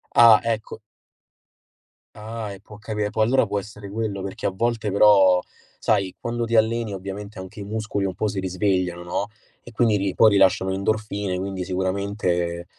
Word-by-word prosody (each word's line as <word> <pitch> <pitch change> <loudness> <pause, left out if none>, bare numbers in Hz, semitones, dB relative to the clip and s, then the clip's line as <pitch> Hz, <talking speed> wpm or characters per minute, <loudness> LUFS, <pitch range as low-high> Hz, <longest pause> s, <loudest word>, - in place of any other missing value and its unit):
Ah, 115 -2 +8
ecco. 110 -2 -3 1.4
Ah, 110 0 -6
e 95 - -11
può 105 +1 -14
capi 105 -1 -2
Può 110 - -1
allora 120 +2 +3
può 100 0 -2
essere 105 0 -10
quello, 105 -3 -3
perché 95 - -4
a - - +2
volte 110 +1 -1
però 95 -3 +6 0.4
sai 100 -4 0
quando 120 0 -3
ti 115 0 -1
alleni 110 0 +2
ovviamente 100 +2 -7
anche 95 +3 -9
i - - -5
muscoli 105 -1 -3
un 95 - -3
po' 105 +3 -1
si 100 -1 -3
risvegliano, 90 -2 -1
no, 90 +4 -2 0.3
e 120 - -13
quindi 115 -2 +2
ri 95 -1 -2
poi 110 -2 +6
rilasciano 95 -1 +3
endorfine, 100 -1 -2
quindi 95 -1 -4
sicuramente, 95 -2 -2
100 Hz, 170 wpm, -23 LUFS, 95-110 Hz, 1.4 s, Ah